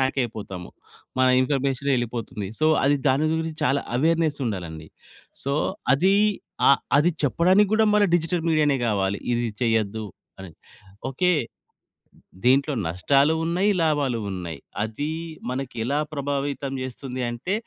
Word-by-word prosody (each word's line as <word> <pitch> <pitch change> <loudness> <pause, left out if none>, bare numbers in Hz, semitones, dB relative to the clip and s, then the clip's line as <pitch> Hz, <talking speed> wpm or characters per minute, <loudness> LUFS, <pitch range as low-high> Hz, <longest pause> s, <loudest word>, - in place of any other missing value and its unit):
హ్యాకయిపోతాము. 110 -9 -2 0.5
మన 130 - +4
information 135 +1 0
ఎళ్ళిపోతుంది. 115 -4 -4
So, 155 - +4 0.2
అది 145 +1 +4
దాని 145 +4 +2
గురించి 160 -1 -3
చాలా 135 +2 +2
అవేర్నెస్సుండాలండి. 125 - -1 0.6
సో, 140 - 0 0.4
అది 190 +7 +3 0.5
అ - - +8 0.3
అది 160 +5 +4
చెప్పడానికి 185 +8 +4
గూడా 220 0 +4
మన 210 - +4
డిజిటల్ 170 0 0
మీడియానే 150 -3 +3
కావాలి. 100 -2 0 0.2
ఇది 120 0 0 0.2
చెయ్యొద్దు 110 -2 0 0.4
అని. 95 -3 -9 0.6
ఓకే, 180 +7 +2 1.1
దీంట్లో 135 +4 +3
నష్టాలున్నాయి, 160 - +2
లాభాలున్నాయి. 110 - -1 0.2
అది 110 +7 -3 0.4
మనకి 130 -1 -4
ఎలా 140 +5 0
ప్రభావితం 140 -1 -2
చేస్తుంది 130 0 -5
అంటే, 120 +11 -3
135 Hz, 110 wpm, -24 LUFS, 115-155 Hz, 1.1 s, అ